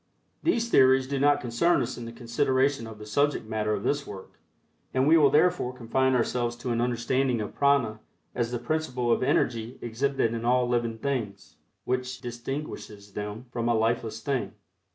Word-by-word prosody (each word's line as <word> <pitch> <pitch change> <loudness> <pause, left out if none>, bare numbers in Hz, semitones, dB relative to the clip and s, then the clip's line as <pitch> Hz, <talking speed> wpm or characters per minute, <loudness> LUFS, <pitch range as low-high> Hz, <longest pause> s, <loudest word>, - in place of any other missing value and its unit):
These 235 -9 +1
theories 130 0 +5
do 140 0 -2
not 145 +1 +3
concern 125 +9 +2
us 120 - -4
in 120 - -7
the 115 - -7
consideration 130 +2 0
of 110 -1 -9
the 105 - -10
subject 140 +5 +1
matter 105 -1 -1
of 100 - -5
this 145 0 -1
work, 95 -2 -10 0.6
and 130 +2 +3
we 160 - +7
will 150 -4 +6
therefore 150 -3 +2
confine 130 +2 +1
ourselves 120 0 0
to 120 +1 -4
an 115 0 0
understanding 125 +1 0
of 105 - -4
prana 140 -7 +2 0.3
as 120 -1 -1
the 120 - -2
principle 125 -2 -1
of - - +2
energy 120 -1 0
exhibited 120 0 -1
in 115 0 -4
all 125 +1 +3
living 120 -2 0
things, 115 -6 -4 0.3
which 130 0 -2
distinguishes 120 -4 -6
them 105 +4 -5
from 120 0 -1
a 120 - +3
lifeless 110 0 -1
thing. 135 +1 -2
120 Hz, 175 wpm, -27 LUFS, 115-135 Hz, 0.6 s, we